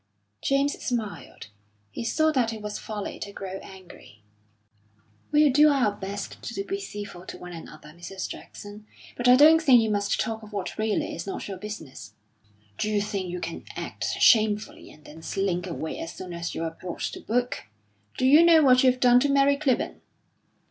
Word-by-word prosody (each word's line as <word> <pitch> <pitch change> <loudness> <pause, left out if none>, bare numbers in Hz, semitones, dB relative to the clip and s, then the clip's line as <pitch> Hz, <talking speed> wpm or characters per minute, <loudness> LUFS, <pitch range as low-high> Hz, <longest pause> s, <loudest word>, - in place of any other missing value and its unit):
James 275 +1 +1
smiled. 225 - -4 0.4
He - - -5
saw 315 +7 +2
that 250 -6 +1
it 220 -2 -8
was 210 0 -5
folly 210 -2 -6
to 200 - -6
grow 195 -1 -6
angry. 185 - -14 1.1
"We'll 300 -1 +5
do 300 +2 +6
our 265 -7 +2
best 200 0 -7
to 195 -4 -4
be 390 - -4
civil 205 - -8
to - - -7
one 180 0 -9
another, 155 -2 -11
Mrs. 175 +4 -7
Jackson. 205 +1 -10 0.3
But 245 - -1
I 250 - +8
don't 315 +4 +7
think 265 -6 +6
you 220 -1 +1
must 205 -1 0
talk 220 0 -2
of 215 -1 -13
what 200 +1 -4
really 215 -1 -1
is 170 +3 -6
not 195 - -5
your 195 -2 -6
business." 160 - -9 0.6
"D'you 210 -1 +1
think 200 -3 -3
you 180 +1 -4
can - - -6
act - - -5
shamefully 215 -2 +3
and 155 - -18
then 160 +2 -12
slink 185 0 -2
away 160 -2 -5
as 165 - -6
soon 185 -2 -8
as 170 0 -5
you - - -3
are 165 - -2
brought 175 +1 -8
to - - -3
book? 245 +2 -2 0.5
Do 255 - +1
you 295 +5 +7
know 330 -2 +6
what 255 -2 +5
you've 255 -1 +4
done 245 -1 +6
to 285 +3 +1
Mary 280 0 +4
Clibborn?" 280 -3 -1
210 Hz, 185 wpm, -26 LUFS, 185-255 Hz, 1.1 s, I